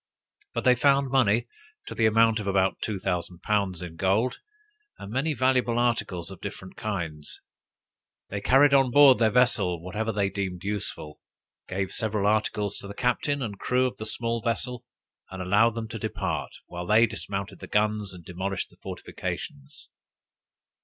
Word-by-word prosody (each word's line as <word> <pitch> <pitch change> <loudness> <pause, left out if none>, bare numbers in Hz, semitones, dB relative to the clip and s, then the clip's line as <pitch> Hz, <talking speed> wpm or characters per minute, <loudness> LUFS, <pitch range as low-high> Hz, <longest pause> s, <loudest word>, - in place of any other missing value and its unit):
But - - -1
they 125 - +6
found 140 +1 +3
money 120 -4 +3 0.4
to - - -6
the 110 - +3
amount 115 0 +4
of 105 - -5
about 95 -1 +1
two 105 -3 -2
thousand 90 -1 -3
pounds 100 -4 0
in 85 -2 -8
gold, 100 +8 +1 0.6
and 100 - -9
many 145 +4 0
valuable 125 -2 +2
articles 110 -7 0
of 95 - -11
different 95 0 -8
kinds. 85 -8 -5 0.9
They 100 0 -3
carried 140 +5 +5
on 135 -2 +5
board 140 0 +7
their 110 -2 +4
vessel 105 -7 +2
whatever 105 +6 -3
they 100 -2 0
deemed 95 -2 -4
useful, 100 -7 -4 0.5
gave 95 +1 -2
several 110 -3 -1
articles 105 -1 0
to 100 - -9
the 100 - -8
captain 135 +3 0
and 105 -4 -5
crew 125 +1 +2
of 125 - -3
the 110 - -5
small 115 +1 -2
vessel, 120 +2 -2 0.5
and 95 - -8
allowed 105 +5 +3
them 115 -1 -4
to 115 -1 -6
depart, - - -3 0.2
while 90 0 -7
they 110 +3 +6
dismounted 100 -2 -5
the - - -9
guns, 105 -1 0
and 90 -2 -11
demolished 95 +1 -4
the - - -22
fortifications. 70 -1 -7
105 Hz, 165 wpm, -26 LUFS, 95-120 Hz, 0.9 s, board